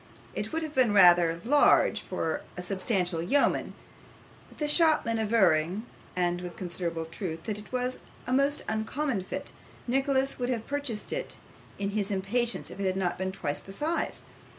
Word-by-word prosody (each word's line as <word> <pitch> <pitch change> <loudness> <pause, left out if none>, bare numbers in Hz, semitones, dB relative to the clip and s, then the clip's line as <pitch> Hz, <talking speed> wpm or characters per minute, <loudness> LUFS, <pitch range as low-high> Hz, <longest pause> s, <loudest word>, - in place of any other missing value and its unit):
It - - -4
would 325 0 -1
have 310 -1 -5
been 250 -7 +3
rather 175 -3 +6
large 290 +4 +5
for 160 - -2 0.2
a 180 - -4
substantial 185 -2 0
yeoman, 275 +12 +1 0.7
but - - -18
the 300 - -1
shopman 300 -8 +4
averring 195 -3 +2 0.3
(and 175 -1 0
with 180 -1 -7
considerable 170 -2 -3
truth) 165 -1 -5
that 210 -2 -3
it 210 - -13
was 250 0 -1 0.3
a 250 - -1
most 280 +2 +2
uncommon 220 +2 -1
fit, 185 - -6 0.3
Nicholas 270 +1 +1
would 245 0 -1
have 230 -3 -2
purchased 285 -7 -2
it - - -3 0.4
in 200 0 -2
his 205 -1 -1
impatience 210 +5 -1
if - - -10
it 190 -1 0
had 180 -2 -1
been 190 0 -1
twice 145 -6 -2
the 195 - -11
size. 315 +10 -2
210 Hz, 165 wpm, -28 LUFS, 180-260 Hz, 0.7 s, rather